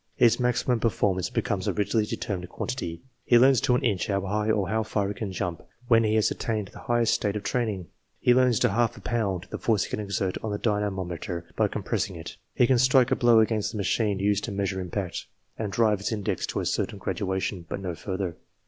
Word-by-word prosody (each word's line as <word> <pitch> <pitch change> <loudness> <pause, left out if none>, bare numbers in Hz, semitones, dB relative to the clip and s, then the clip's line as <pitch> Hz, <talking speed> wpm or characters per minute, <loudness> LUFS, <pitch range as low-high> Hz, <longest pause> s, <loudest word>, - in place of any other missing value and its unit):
His 120 -1 +4
maximum 125 0 +1
per 115 - +2
formance 95 -4 0
becomes - - -1
a - - +1
rigidly 105 +1 +1
determinate 95 -6 -4
quantity. 85 +1 -4 0.2
He 120 - +5
learns 130 0 +5
to 125 - +3
an - - 0
inch, 95 -4 +1
how 100 -1 0
high 105 +3 -1
or 105 -3 +2
how 110 +2 0
far 105 -2 -1
he - - -2
can 105 -2 -5
jump, 90 -3 -3 0.3
when 115 -1 +6
he 110 0 +2
has 110 - +3
attained 105 -4 -2
the - - -12
highest 120 -1 +2
state 105 -1 0
of 105 - -3
training. 110 -7 -1 0.3
He 125 - +4
learns 125 -2 +4
to - - +4
half 120 +3 +1
a - - -9
pound, 100 -6 -1
the - - -4
force 110 -5 +2
he - - -7
can - - -2
exert 100 -2 -2
on 110 - -3
the 105 - -1
dyna 105 -1 0
mometer, 90 -2 -5
by 110 - +3
compressing 100 -1 -2
it. 85 0 -8 0.2
He 125 - +5
can 125 0 +3
strike 130 0 +4
a - - +4
blow 120 -2 +5
against 110 -1 0
the - - -4
machine 105 +1 +1
used 100 +1 +1
to 115 - -5
measure 100 -1 -2
impact, 90 0 -4 0.3
and 105 -3 -3
drive 105 -2 +2
its 100 - -2
index 105 -3 -2
to - - -2
a - - -3
certain - - -1
graduation, 95 -2 -2
but - - -3
no 90 -3 -4
further. 95 -1 -4
105 Hz, 230 wpm, -26 LUFS, 95-115 Hz, 0.3 s, when